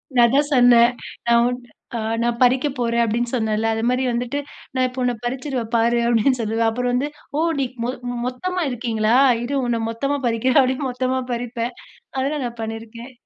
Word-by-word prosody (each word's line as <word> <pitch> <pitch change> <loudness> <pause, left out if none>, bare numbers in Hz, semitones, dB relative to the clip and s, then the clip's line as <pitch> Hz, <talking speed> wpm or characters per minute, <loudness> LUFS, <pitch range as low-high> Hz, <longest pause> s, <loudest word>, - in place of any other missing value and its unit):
நான் 240 -1 +7
அதான் 285 +4 +2
சொன்னேன். 245 -2 +6 0.4
"நான் 235 0 +5
உன்ன 245 -1 -6 0.6
நான் 235 0 -1
பறிக்கப் 260 +3 +2
போறேன்" 235 0 +1
அப்பிடீன்னு 235 +2 -1
சொன்னேன்ல. 220 -1 0
அது 225 +1 -2
மாரி 250 +1 +1
வந்துட்டு, 245 +4 -2 0.4
"நான் 255 0 +2
இப்போ 250 +1 -7
உன்ன 245 0 +1
பறிச்சிருவேன் 250 -2 -3
பாரு" 235 +1 +3
அப்பிடீன்னு 240 +2 +2
சொல்லுவேன். 225 +1 +1
அப்புறம் 245 +2 -1
வந்து 275 +4 0 0.3
"ஓ! - - +1 0.2
நீ 270 - +1 0.2
மொத் 250 0 -3 0.3
மொத்தமா 360 +9 -2
இருக்கீங்களா? 230 -2 0 0.3
இரு 280 +4 -2
உன்ன 235 -1 0
மொத்தமா 275 +5 -1
பறிக்கிறேன்" 250 +4 +3
அப்டீன்னு 260 +1 -1
மொத்தமா 255 +1 -1
பறிப்பேன். 235 0 -3 0.5
அதெல்லாம் 275 0 -1
நான் 235 -1 -6
பண்ணிருக்கேன். 225 +3 -7
245 Hz, 165 wpm, -21 LUFS, 230-260 Hz, 0.6 s, நான்